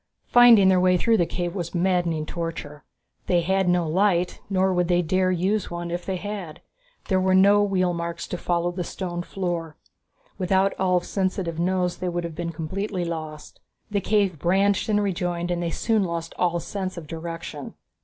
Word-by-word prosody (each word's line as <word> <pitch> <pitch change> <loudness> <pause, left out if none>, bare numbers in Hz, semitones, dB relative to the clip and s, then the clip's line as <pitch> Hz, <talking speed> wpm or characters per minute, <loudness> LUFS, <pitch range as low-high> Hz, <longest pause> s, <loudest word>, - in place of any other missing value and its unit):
Finding 240 -5 +7
their 185 -1 +4
way 180 0 +4
through 225 +5 +3
the 175 -4 +2
cave 175 -1 -3
was 175 -2 -5
a - - +2
maddening 175 -3 +1
torture. 165 -3 -6 0.4
They 175 -1 +3
had 190 +1 +1
no 175 -2 +2
light, 180 +1 +1
nor 190 -1 +2
would 180 -1 +1
they 175 0 +2
dare 185 +3 +1
use 185 +3 0
one 175 0 -5
if 175 +1 -4
they 190 - -1
had. 190 -4 -6 0.5
There 190 -2 +2
were 185 0 +3
no 200 +2 +6
wheel 185 -3 +1
marks 170 0 -4
to 180 - -3
follow 175 0 0
on 175 - -8
the 180 - -2
stone 175 -1 -4
floor. 175 -4 -4 0.6
Without 190 +1 +2
Ulv's 180 -2 +1
sensitive 185 -4 -2
nose 180 0 0
they 180 - -2
would 175 0 -2
have 170 -1 -5
been 170 +1 -4
completely 180 +4 -3
lost. 155 -2 -6 0.3
The 200 -1 0
cave 200 -6 +1
branched 195 +5 +2
and 210 -1 +2
rejoined 175 -2 -2
and 175 0 -1
they 170 - -1
soon 220 +4 +1
lost 170 -2 -4
all 175 -1 +1
sense 185 +1 -5
of 170 - -7
direction. 165 -2 -7
180 Hz, 190 wpm, -24 LUFS, 170-190 Hz, 0.6 s, Finding